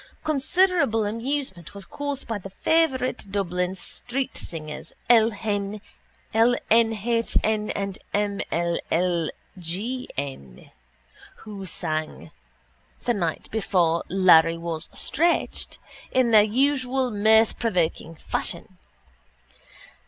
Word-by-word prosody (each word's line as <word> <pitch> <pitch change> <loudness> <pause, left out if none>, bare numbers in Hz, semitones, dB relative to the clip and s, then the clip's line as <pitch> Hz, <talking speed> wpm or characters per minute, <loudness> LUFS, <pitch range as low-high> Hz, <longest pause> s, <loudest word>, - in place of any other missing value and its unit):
Considerable 310 - +2
amusement 230 - -3
was 200 -1 -6
caused 285 -1 -4
by 225 -2 -2
the 195 - -9
favourite 260 - +1
Dublin 180 -2 -1
streetsingers 180 - -5 0.2
L 225 -2 +6
n 205 -1 -1 0.5
h 230 0 +2
n 215 -1 0
and 195 -1 -3
M 205 -1 0
ll 170 0 0 0.3
g 210 +10 -3
n 130 - -6 0.7
who 200 -3 -7
sang 155 - -4 0.7
The 240 - +2
Night 170 -7 -3
before 175 -6 +1
Larry 170 -3 +5
was 165 -1 -5
stretched 340 +2 0 0.3
in 255 -2 +2
their 215 -2 +8
usual 260 +3 +1
mirth 220 +1 +4
provoking 175 -6 0
fashion. - - -5
210 Hz, 95 wpm, -25 LUFS, 175-245 Hz, 0.7 s, their